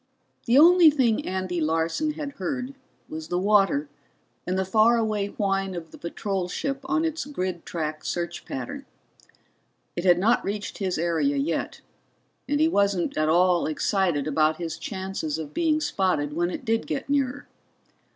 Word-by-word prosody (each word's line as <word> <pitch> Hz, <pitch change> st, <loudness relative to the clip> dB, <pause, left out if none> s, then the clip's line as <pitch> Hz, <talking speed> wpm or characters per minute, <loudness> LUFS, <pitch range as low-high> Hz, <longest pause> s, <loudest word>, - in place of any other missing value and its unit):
] -, -, -41 dB
The 240 Hz, +3 st, +5 dB
only 340 Hz, +2 st, +8 dB
thing 255 Hz, -7 st, +1 dB
Andy 185 Hz, -2 st, -2 dB
Larson 165 Hz, -, 0 dB
had 295 Hz, -2 st, -5 dB
heard 255 Hz, -1 st, -3 dB, 0.3 s
was 155 Hz, 0 st, -7 dB
the 175 Hz, -, -1 dB
water 195 Hz, -6 st, +3 dB, 0.6 s
and 185 Hz, +1 st, 0 dB
the 190 Hz, -, 0 dB
far 220 Hz, +4 st, +4 dB
away 215 Hz, -3 st, 0 dB
whine 195 Hz, -2 st, -1 dB
of 165 Hz, -2 st, -7 dB
the -, -, -12 dB
patrol 190 Hz, +1 st, -3 dB
ship 275 Hz, +7 st, -2 dB
on 315 Hz, +4 st, +1 dB
its 325 Hz, 0 st, -2 dB
grid 185 Hz, -, -4 dB
track 155 Hz, -2 st, -4 dB
search 175 Hz, -1 st, -3 dB
pattern. 280 Hz, 0 st, -6 dB, 1.1 s
It 175 Hz, -, -3 dB
had 175 Hz, -2 st, +5 dB
not 220 Hz, +7 st, +2 dB
reached 205 Hz, +1 st, -4 dB
his 190 Hz, -3 st, -1 dB
area 170 Hz, -, +1 dB
yet, 275 Hz, +3 st, -2 dB, 0.7 s
and 290 Hz, 0 st, +1 dB
he 315 Hz, -, +5 dB
wasn't 200 Hz, -, +1 dB
at 155 Hz, 0 st, +1 dB
all 175 Hz, +1 st, +3 dB
excited 160 Hz, -1 st, 0 dB
about 155 Hz, +1 st, +2 dB
his 165 Hz, -2 st, -5 dB
chances 190 Hz, -6 st, -4 dB
of 150 Hz, -2 st, -7 dB
being 315 Hz, -2 st, +2 dB
spotted 180 Hz, -, 0 dB
when 175 Hz, +2 st, 0 dB
it -, -, -6 dB
did 225 Hz, 0 st, 0 dB
get 270 Hz, -, -3 dB
nearer. 280 Hz, 0 st, -1 dB
195 Hz, 165 wpm, -25 LUFS, 170-265 Hz, 1.1 s, only